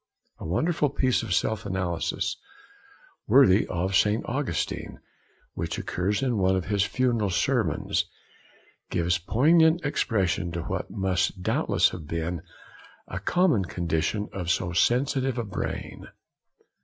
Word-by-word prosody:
A - - -6
wonderful 150 - +1
piece 130 -2 +1
of - - -6
self 105 +4 0
analysis, 95 -4 -2 0.9
worthy 110 -5 +5
of 95 +2 -1
St. 105 +3 +2
Augustine, 130 - -3 0.5
which - - -3
occurs 100 +6 -1
in 120 -5 0
one 95 0 +3
of 95 - -2
his 100 -1 +1
funeral 115 -3 0
sermons, 110 - 0 0.8
gives 85 +1 +1
poignant 160 - +3
expression 95 - 0
to 85 -1 -3
what - - -4
must 95 -1 -1
doubtless - - +2
have 80 -5 -8
been 85 +1 -3 0.7
a 90 - -5
common 145 - +2
condition 85 +4 -1
of 90 -3 -4
so 90 -1 0
sensitive 130 +5 +1
a 120 - -1
brain. 100 -4 -5
100 Hz, 125 wpm, -26 LUFS, 90-125 Hz, 0.9 s, worthy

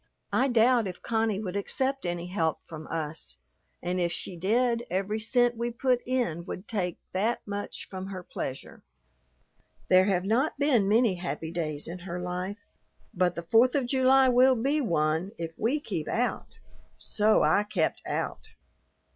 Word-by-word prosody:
"I 265 - +3
doubt 240 -2 +4
if 180 - -8
Connie 220 -3 0
would 195 -3 -4
accept 265 +5 -1
any 175 0 -3
help 170 -4 -1
from 155 -1 -9
us, 160 -1 -5 0.5
and 180 +1 -1
if 170 -1 +1
she 180 - -4
did, 235 +6 +1
every 195 +4 -1
cent 245 +2 +2
we 235 +1 -2
put 250 +1 +1
in 240 -11 -1
would 185 +1 -7
take 180 -6 -2 0.2
that 215 +6 +1
much 205 0 -5
from 190 0 -6
her 185 -2 -6
pleasure. 135 -5 -6 1.1
There 185 0 +6
have 190 -2 +1
not 245 +10 +1
been 270 -8 +3
many 220 -3 +3
happy 160 -2 -4
days 155 -4 -3
in 175 +3 -6
her 175 0 -5
life, 180 +3 -4 0.6
but 180 -1 +1
the 170 - -5
Fourth 230 - +4
of 275 -3 +1
July 260 +1 +4
will 255 +1 +5
be 275 +6 +1
one 165 - 0
if 165 -1 -4
we 255 +7 0
keep 185 - -4
out." 245 +2 -2 0.4
So 215 +1 +2
I - - +4
kept 205 -6 -1
out. - - -3
200 Hz, 165 wpm, -28 LUFS, 175-240 Hz, 1.1 s, There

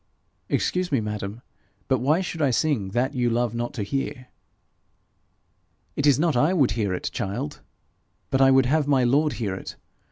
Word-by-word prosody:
'Excuse 180 -1 0
me, 135 - +2
madam, 105 +1 -5 0.4
but 130 -2 +2
why 150 +8 +2
should 170 -3 -4
I 140 - +3
sing 130 -5 +1
that 120 +8 -1
you 125 -3 +1
love 120 -1 0
not 120 0 -3
to 110 - -2
hear?' 130 +3 -4 1.7
'It 145 - +1
is 140 -4 +5
not 160 -1 +1
I 150 +9 +3
would 135 - +3
hear 105 -3 -1
it, - - -4
child, 120 +10 -4 0.7
but 135 - +2
I 135 - +7
would 135 -1 +5
have 145 +3 +1
my 135 -3 +3
lord 145 +5 +2
hear 105 -5 -3
it. 95 - -7
130 Hz, 180 wpm, -24 LUFS, 115-145 Hz, 1.7 s, I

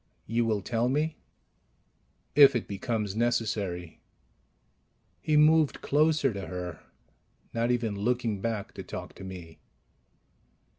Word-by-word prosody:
"You 115 +2 0
will 105 -3 0
tell 120 +2 0
me?" 150 +4 0 1.2
"If 140 -1 +8
it 120 - -1
becomes 105 0 -2
necessary." 105 -7 -1 1.2
He 155 -1 +2
moved 155 0 +4
closer 150 -3 +2
to 100 -1 -6
her, 90 -2 -5 0.7
not 115 +1 0
even 115 -4 0
looking 115 -1 -1
back 110 -2 -3
to - - -7
talk - - -7
to - - -11
me. 85 -4 -9
115 Hz, 115 wpm, -28 LUFS, 100-130 Hz, 1.2 s, If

